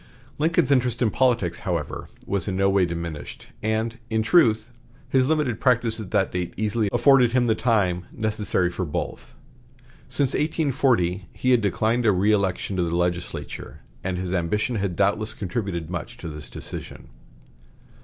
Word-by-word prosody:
Lincoln's 155 -3 +2
interest 125 -2 +2
in 110 - +2
politics, 120 -10 +1
however, 85 -5 -3 0.2
was 100 -4 -1
in 95 - -1
no 95 +1 +3
way 95 -2 +3
diminished, 85 -3 -6 0.2
and, 110 +2 -1
in 110 -1 +1
truth, 115 -5 +3 0.4
his 130 0 +2
limited 150 -7 +1
practice 120 -3 +2
at 105 -4 -6
that 100 -3 +1
date 90 -1 -3
easily 110 0 0
afforded 125 0 +5
him 125 -1 +3
the 115 - +3
time 100 -7 +1
necessary 105 -5 0
for 90 - -3
both. 75 -6 -5 0.7
Since 135 0 +1
1840 130 - +1
he 130 - 0
had 125 -2 +5
declined 110 +4 +1
a - - +7
reëlection 100 -1 +1
to - - +2
the 85 0 -1
legislature, 90 0 -3 0.2
and 95 -1 -2
his 90 0 -3
ambition 105 +7 0
had 100 -3 -1
doubtless 105 +3 +1
contributed 90 -5 -3
much 85 -3 -5
to - - -7
this 75 -1 -8
decision. - - -8
105 Hz, 155 wpm, -24 LUFS, 90-120 Hz, 0.7 s, a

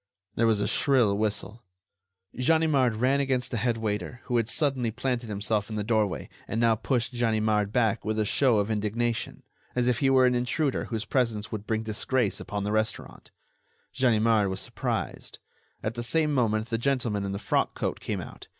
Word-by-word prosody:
There 115 - +2
was 110 -2 +3
a 100 - 0
shrill 120 -7 +3
whistle. 105 +1 -2 0.7
Ganimard 140 -3 +2
ran 130 +5 +2
against 130 -3 0
the 120 - -1
head 115 +1 0
waiter, 110 +2 -3
who 120 -2 0
had 115 -1 0
suddenly 130 -4 0
planted 120 0 -2
himself 105 +1 -1
in 110 - -5
the 105 - -1
doorway 105 -3 0 0.2
and 115 - -2
now 115 -1 +4
pushed 120 +2 -1
Ganimard 110 -3 +1
back 115 -1 +1
with 110 0 -2
a 110 - +1
show 125 +1 +3
of 105 +2 0
indignation, 115 +3 -2 0.3
as 125 -1 +1
if 125 - +2
he 135 - +3
were 130 -1 +5
an 125 - +3
intruder 130 +4 0
whose 115 -1 -4
presence 115 -5 -1
would 105 -1 -5
bring 110 0 0
disgrace 110 +1 0
upon 100 -1 -4
the 105 - -2
restaurant. 110 0 -3 0.6
Ganimard 115 -5 +3
was 95 0 -3
surprised. - - -4 0.5
At 110 - -2
the 120 - -4
same 150 +5 +2
moment 110 -4 0
the 115 - 0
gentleman 120 -6 0
in 100 - -3
the 100 - -3
frock 105 - 0
coat - - -2
came - - -3
out. - - -11
115 Hz, 185 wpm, -27 LUFS, 105-125 Hz, 0.7 s, were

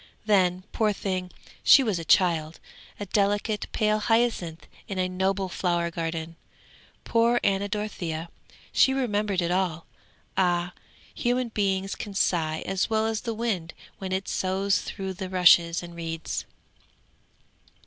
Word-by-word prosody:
Then, 185 -3 +3
poor 215 -2 +1
thing, 185 -2 -3 0.3
she 275 - +8
was 210 -8 0
a - - -5
child, 165 -2 +2 0.4
a 205 - -4
delicate, 205 +2 0
pale 215 0 +1
hyacinth 210 -9 0 0.2
in 195 - -5
a 185 0 +1
noble 190 +1 0
flower 175 -2 -1
garden. 165 0 -4 0.7
Poor 235 +1 +3
Anna 200 +1 +1
Dorothea; 175 -6 -4 0.4
she 265 - +4
remembered 210 -7 0
it 170 - -1
all! 180 -3 -1 0.5
Ah, 175 -1 +1 0.4
human 245 0 0
beings 195 -2 0
can 205 -2 -7
sigh 160 -5 +1
as 190 +2 -1
well 220 0 +1
as 225 -1 -1
the 230 -2 -3
wind 205 -8 -2 0.2
when 190 -1 -5
it 190 0 -2
soughs 190 +1 0
through 190 -1 -5
the 185 0 -6
rushes 175 -2 +5
and 170 0 -9
reeds. 165 -1 -4
190 Hz, 140 wpm, -26 LUFS, 175-210 Hz, 0.7 s, she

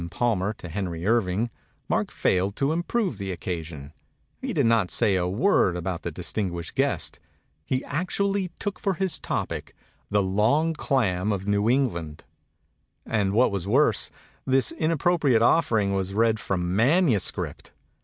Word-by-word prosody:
Palmer 105 -1 0
to 90 - -10
Henry 90 -2 -4
Irving, 110 0 +1 0.4
Mark - - 0
failed 95 +2 0
to 140 +2 +1
improve 175 - -1
the 95 -1 -3
occasion; 80 -5 -6 0.5
he - - -3
did - - +1
not 115 -5 +3
say 105 -5 +2
a 90 -1 +1
word 100 - +2
about 90 0 -3
the - - -3
distinguished 85 0 -3
guest; - - 0 0.5
he 130 0 -1
actu 180 +6 -1
ally 200 -1 0
took 205 0 -4
for 195 -2 0
his 190 -4 -1
topic - - -4 0.3
the 100 -1 +2
long 110 +13 +2
clam 105 - 0
of 100 -2 -2
New 105 +2 +2
England 85 - -1 0.8
and 100 -3 0
what 120 +2 +4
was 100 -2 -3
worse, 135 +8 +3 0.3
this 130 -2 +2
inappropri 160 -3 +2
ate 110 - +4
offering 110 -9 +3
was 95 0 -2
read 110 0 +3
from 90 -2 -2
manuscript 125 - +1
105 Hz, 150 wpm, -25 LUFS, 95-135 Hz, 0.8 s, what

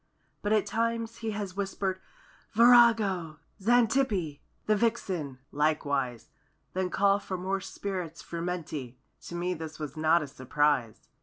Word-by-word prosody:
But 205 - -1
at 215 -2 +3
times 230 0 -1
he 225 - -3
has 205 -3 -4
whispered: 195 -1 -2 0.5
"Virago!" 225 -8 +5 0.2
"Xantippe!" 225 - +2 0.3
"The 215 - +3
Vixen!" 190 - -1
likewise; 140 -5 0 0.4
Then 185 0 -1
call 200 +2 +3
for 190 -2 -5
more 190 +2 -2
spirits 180 -5 -5
frumenti— 165 -7 -4 0.3
To 175 - -6
me 175 +1 -1
this 160 -2 -7
was 150 -2 -6
not 160 +1 +3
a - - -6
surprise. 135 -3 0
185 Hz, 130 wpm, -29 LUFS, 155-210 Hz, 0.5 s, Virago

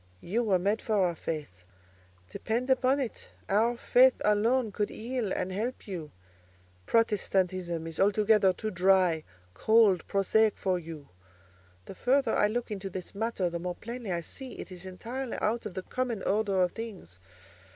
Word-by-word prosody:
You 215 +7 -1
were 205 -5 +2
made 200 +5 0
for 220 - -1
our 185 -4 +2
faith: 150 - -6 0.7
depend 240 - -1
upon 260 +2 +3
it 255 -5 -5 0.2
our 230 +4 +2
faith 255 +2 +5
alone 220 +3 +2
could 205 +1 -1
heal 235 -2 -3
and 185 - -2
help 220 +7 -4
you—Protestantism 160 - -2
is 165 0 -7
altogether 205 0 +4
too 215 +4 -4
dry, 185 -3 +3 0.3
cold, 220 - +4
prosaic 210 +2 +2
for 185 -2 0
you. 160 -4 -10 0.8
The - - -8
further 255 +4 +2
I 210 - +4
look 235 +1 -3
into 195 -1 -4
this 185 -1 -7
matter, 215 -3 -1
the 170 0 -3
more 180 +1 -4
plainly 235 -1 -6
I 170 -1 -1
see 260 +9 -9
it - - -9
is 185 +1 -8
entirely 235 +7 -5
out 225 +1 -1
of 185 - -11
the 185 - -4
common 245 -3 -3
order 200 -2 +2
of 180 - 0
things. 200 - -9
200 Hz, 160 wpm, -29 LUFS, 180-230 Hz, 0.8 s, faith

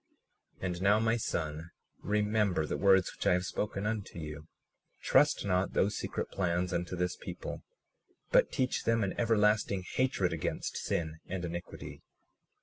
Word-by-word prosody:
37:32 - - -3
And 90 -1 -2
now, 100 +2 +5
my 115 +1 +2
son, 80 -7 -3 0.3
remember 105 -4 +1
the - - -2
words 95 -2 +4
which - - -3
I - - +6
have 90 +1 +1
spoken 100 -1 -2
unto 105 -4 -3
you; 75 -1 -7 0.5
trust - - +3
not 90 -1 +1
those 100 +2 +2
secret - - -3
plans 90 -1 0
unto 85 +1 -2
this 90 0 -1
people, - - -6 0.7
but - - +5
teach 130 -2 0
them 115 -1 +3
an 95 - -1
everlasting 105 -4 +2
hatred 95 -4 0
against 80 - -3
sin 80 -1 -2
and 90 -1 -3
iniquity. 85 +1 -7
95 Hz, 150 wpm, -31 LUFS, 85-105 Hz, 0.7 s, I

